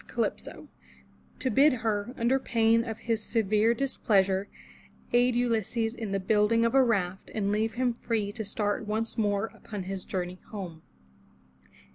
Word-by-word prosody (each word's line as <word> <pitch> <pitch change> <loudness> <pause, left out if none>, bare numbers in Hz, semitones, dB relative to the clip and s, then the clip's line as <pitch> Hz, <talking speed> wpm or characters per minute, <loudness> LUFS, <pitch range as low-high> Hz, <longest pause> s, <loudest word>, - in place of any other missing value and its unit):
Calypso, - - -3 0.7
to 260 - -1
bid 280 +6 +5
her, 210 +1 0
under 245 +3 +2
pain 230 -2 +3
of 225 -2 -5
his 225 -2 -1
severe 220 +1 +2
displeasure, 200 -7 +1 0.7
aid 245 0 +4
Ulysses 230 -1 0
in 225 -4 -5
the 195 - 0
building 210 +4 +3
of 230 - +1
a 270 -1 +6
raft, 195 -6 -1
and 200 -2 0
leave 220 +2 0
him 250 -1 +1
free 225 -3 -2
to 220 +1 -5
start 205 +1 -2
once 220 +2 -2
more 205 0 0
upon 205 -4 -7
his 190 0 -5
journey 180 -1 -4
home. 180 -7 -7
220 Hz, 150 wpm, -28 LUFS, 200-230 Hz, 0.7 s, a